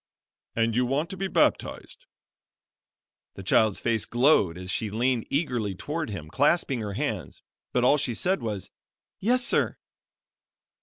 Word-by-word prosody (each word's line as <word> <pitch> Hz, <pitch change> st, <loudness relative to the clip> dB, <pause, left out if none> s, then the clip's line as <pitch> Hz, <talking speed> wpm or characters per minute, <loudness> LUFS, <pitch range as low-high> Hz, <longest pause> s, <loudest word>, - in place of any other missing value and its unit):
"And 115 Hz, -1 st, +1 dB
you 125 Hz, -, +3 dB
want 145 Hz, +7 st, -1 dB
to -, -, -5 dB
be 195 Hz, +1 st, -1 dB
baptized." -, -, 0 dB, 1.3 s
The 95 Hz, -, -8 dB
child's 105 Hz, +2 st, +3 dB
face 115 Hz, -3 st, 0 dB
glowed 120 Hz, -, +3 dB
as 90 Hz, 0 st, -6 dB
she 110 Hz, -, -1 dB
leaned 120 Hz, +2 st, 0 dB
eagerly 125 Hz, -, -1 dB
toward 150 Hz, -, -4 dB
him, 85 Hz, -7 st, -6 dB
clasping 140 Hz, -, +2 dB
her 105 Hz, -2 st, -4 dB
hands, -, -, -4 dB, 0.3 s
but 125 Hz, -, +1 dB
all 140 Hz, +4 st, +5 dB
she 125 Hz, -4 st, -1 dB
said 185 Hz, -, 0 dB
was, 105 Hz, -5 st, -4 dB, 0.5 s
"Yes, 250 Hz, +4 st, +2 dB
sir." -, -, +1 dB
120 Hz, 145 wpm, -26 LUFS, 105-150 Hz, 1.3 s, all